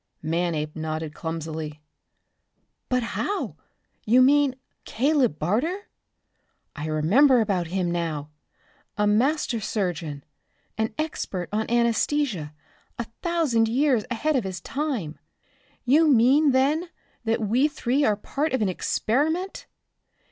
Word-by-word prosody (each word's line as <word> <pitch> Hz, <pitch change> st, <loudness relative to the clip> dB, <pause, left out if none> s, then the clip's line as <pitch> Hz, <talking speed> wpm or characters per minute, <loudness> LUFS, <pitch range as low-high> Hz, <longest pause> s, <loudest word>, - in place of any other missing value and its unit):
Manape 160 Hz, -2 st, -1 dB
nodded 155 Hz, -1 st, -4 dB
clumsily. 160 Hz, -2 st, -5 dB, 1.1 s
"But 250 Hz, -1 st, +1 dB
how? 400 Hz, -, -3 dB, 0.5 s
You 245 Hz, +4 st, +5 dB
mean 280 Hz, 0 st, +4 dB, 0.3 s
Caleb 265 Hz, -, +1 dB
Barter? 290 Hz, -, -1 dB, 0.9 s
I 150 Hz, +1 st, -5 dB
remember 215 Hz, -, +4 dB
about 195 Hz, -6 st, 0 dB
him 180 Hz, 0 st, -1 dB
now. 155 Hz, -4 st, -3 dB, 0.7 s
A 210 Hz, -, +2 dB
master 240 Hz, +4 st, +2 dB
surgeon, 175 Hz, -9 st, -3 dB, 0.5 s
an 220 Hz, 0 st, -1 dB
expert 205 Hz, -, -3 dB
on 220 Hz, +1 st, -1 dB
anesthesia 235 Hz, -, +1 dB, 0.5 s
a 235 Hz, -, -2 dB, 0.2 s
thousand 315 Hz, -11 st, +2 dB
years 255 Hz, -2 st, +2 dB
ahead 300 Hz, +6 st, 0 dB
of 255 Hz, -, +1 dB
his 190 Hz, -1 st, -5 dB
time. 260 Hz, -, -3 dB, 0.7 s
You 300 Hz, +6 st, +5 dB
mean 275 Hz, +3 st, +5 dB
then 285 Hz, +6 st, +2 dB, 0.4 s
that 225 Hz, 0 st, 0 dB
we 250 Hz, +8 st, +3 dB
three 280 Hz, -1 st, 0 dB
are 215 Hz, -6 st, +3 dB
part 280 Hz, +8 st, -3 dB
of 260 Hz, -, +1 dB
an 200 Hz, -, +1 dB
experiment? 310 Hz, -, -1 dB
230 Hz, 115 wpm, -25 LUFS, 175-285 Hz, 1.1 s, You